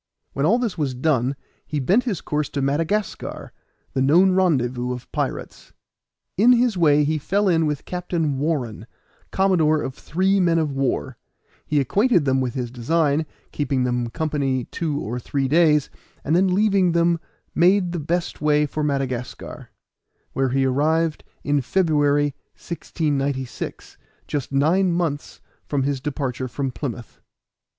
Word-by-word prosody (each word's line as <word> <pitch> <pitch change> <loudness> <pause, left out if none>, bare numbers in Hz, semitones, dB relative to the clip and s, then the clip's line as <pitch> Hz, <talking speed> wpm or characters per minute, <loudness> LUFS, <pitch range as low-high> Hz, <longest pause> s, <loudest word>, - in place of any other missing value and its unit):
When 140 +3 +1
all 225 +7 +4
this 230 -8 -2
was 135 -4 -1
done 130 -1 +1 0.3
he 150 - -3
bent 195 - +2
his 205 -10 -2
course 150 -1 -2
to 140 - -3
Madagascar, 165 +9 -2 0.4
the 130 - 0
known 170 +8 +5
rendezvous 130 -9 +1
of 125 - -9
pirates. - - -4 0.6
In 235 +6 +6
his 240 -2 +2
way 150 -4 +4
he 155 +1 0
fell 200 +7 0
in 165 -3 +3
with 150 -2 -3
Captain 170 -6 -2
Warren, 130 -8 -2 0.4
commodore 165 -6 +2
of 130 - -4
three 190 +7 0
men 170 -2 +3
of 155 -3 0
war; 135 -1 -2 0.5
he 150 - +2
acquainted 195 - +2
them 135 -1 +2
with 125 -2 -2
his 125 -3 -3
design, 150 +4 +1 0.2
kept 145 - -3
them 125 -3 0
company 140 -3 -1
two 155 -4 -2
or 120 0 -4
three 135 +2 -1
days, 150 -1 +3 0.3
and 155 - +1
then 190 +2 +4
leaving 195 -2 +3
them 170 0 +2 0.3
made 180 +1 +3
the 175 - -3
best 170 +2 -2
way 150 0 +3
for 150 +1 -3
Madagascar, 135 -4 -3 0.6
where 135 -1 +1
he 135 +1 +1
arrived 155 +4 +1 0.2
in 145 -1 +1
February, 145 -2 +2 0.2
1696, 140 -6 -3 0.3
just 140 -3 -3
nine 170 +7 +3
months 165 -4 -2 0.2
from 140 -2 -1
his 140 -1 -1
departure 135 -3 -3
from 135 +2 -3
Plymouth. 120 -3 -7
150 Hz, 145 wpm, -22 LUFS, 135-170 Hz, 0.6 s, In